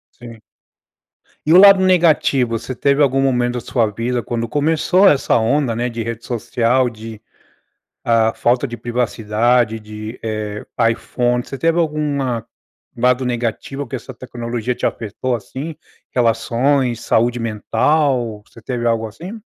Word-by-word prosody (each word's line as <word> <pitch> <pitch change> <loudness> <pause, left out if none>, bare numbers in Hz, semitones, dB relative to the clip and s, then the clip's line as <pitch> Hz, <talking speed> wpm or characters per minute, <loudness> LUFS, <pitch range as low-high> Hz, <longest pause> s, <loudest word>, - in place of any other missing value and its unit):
Sim. 115 -2 -12 1.1
E 160 - +4
o - - +9
lado 195 0 +8
negativo, 155 -10 +3
você 125 +3 -6
teve 140 +3 +2
algum 135 -1 +2
momento 125 -2 +1
da 125 - -2
sua 120 -2 0
vida 120 +3 -2
quando 115 0 -3
começou 160 - +3
essa 140 -6 +3
onda, 120 +1 +1
né, 120 +2 -1
de 115 -1 -4
rede 115 0 -5
social, 120 +1 0
de 110 -1 -9 0.9
ah, 115 -1 +2
falta 125 +3 +1
de 120 - -6
privacidade 120 0 0
de 110 +2 -8
eh, 105 -1 -4 0.3
iPhone, 120 +1 -1
você 135 - -7
teve 165 0 +2
alguma 145 -7 -1 0.5
lado 125 +2 +2
negativo 125 +3 -3
que 130 - -6
essa 130 +1 -8
tecnologia 120 -1 -4
te - - -14
apertou 120 +3 -3
assim? 135 +9 -7 0.3
Relações, 120 +1 +1
saúde 120 +2 +1
mental, 120 +1 0
você - - -16
teve 120 -1 -2
algo 115 -1 +1
assim? 175 - -9
120 Hz, 140 wpm, -18 LUFS, 115-135 Hz, 1.1 s, o